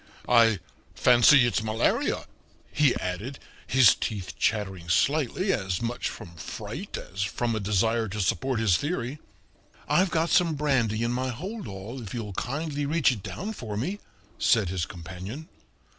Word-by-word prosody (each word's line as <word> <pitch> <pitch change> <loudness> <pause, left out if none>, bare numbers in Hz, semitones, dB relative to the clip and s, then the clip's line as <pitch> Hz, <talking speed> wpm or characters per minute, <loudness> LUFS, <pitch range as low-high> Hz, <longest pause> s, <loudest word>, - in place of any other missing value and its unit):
"I 115 -3 +5 0.4
fancy 125 +2 +6
it's 120 - +1
malaria," 110 +1 0 0.5
he 150 -3 +3
added, 100 +10 -4 0.3
his 120 -1 +6
teeth 100 -4 -4
chattering 95 -5 -1
slightly, 150 - +2
as 95 - -1
much 120 +1 -2
from 85 -1 -10
fright - - -6
as 95 - -6
from 115 +4 -1
a - - -1
desire 110 +3 +1
to 105 +2 -5
support 120 +6 0
his 105 -6 +3
theory. 145 - -3 0.7
"I've 185 +1 +3
got 165 0 0
some 170 -4 +3
brandy 125 -7 +1
in 120 - 0
my 130 +1 -1
holdall, 125 - -6
if 110 0 -7
you'll 105 -4 -4
kindly 145 - -3
reach 155 -2 +3
it 115 -5 -4
down 205 - -5
for 110 - -6
me," 180 - -2 0.4
said 110 -6 +3
his 90 -2 -2
companion. 95 - -8
115 Hz, 150 wpm, -27 LUFS, 100-140 Hz, 0.7 s, fancy